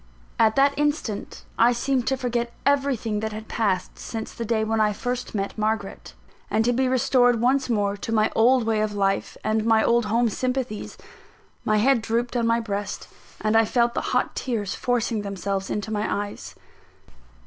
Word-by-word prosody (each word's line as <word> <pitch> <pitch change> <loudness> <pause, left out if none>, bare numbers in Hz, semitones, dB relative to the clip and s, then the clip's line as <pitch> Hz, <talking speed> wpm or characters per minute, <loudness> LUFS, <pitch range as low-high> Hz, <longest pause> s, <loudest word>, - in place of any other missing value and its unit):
At 220 -1 +4
that 275 +1 +4
instant, 295 -8 -2
I 235 +2 +5
seemed 255 +1 -1
to 265 0 +1
forget 240 -2 -2
everything 270 -6 +1
that 220 0 -3
had 215 +1 -7
passed 190 -5 -1
since 225 -1 -6
the 235 - -5
day 220 -1 +1
when 220 0 0
I 210 -1 +2
first 245 +2 -4
met 200 -1 -2
Margaret, 215 -2 -3 0.3
and 220 +1 +1
to 245 - +3
be 260 +2 +1
restored 245 -1 +3
once 260 +3 +2
more 205 -3 +1
to 205 +2 -6
my 215 -1 +2
old 245 +2 +4
way 220 -1 +1
of 215 -1 -1
life 195 -1 0
and 215 0 +1
my 220 -1 +4
old 235 -1 +3
home 230 +3 +2
sympathies. 250 -1 -3 0.7
My 215 - +2
head 245 +2 +3
drooped 235 +3 -1
on 235 -1 +1
my 230 0 +3
breast, 205 -3 -4 0.3
and 215 +1 +1
I 225 - +6
felt 235 +1 +1
the - - -1
hot - - 0
tears 220 -7 -2
forcing 240 -3 -1
themselves 195 -1 -3
into 210 +1 -3
my 210 0 -1 0.2
eyes. - - -10
225 Hz, 180 wpm, -24 LUFS, 215-245 Hz, 0.7 s, I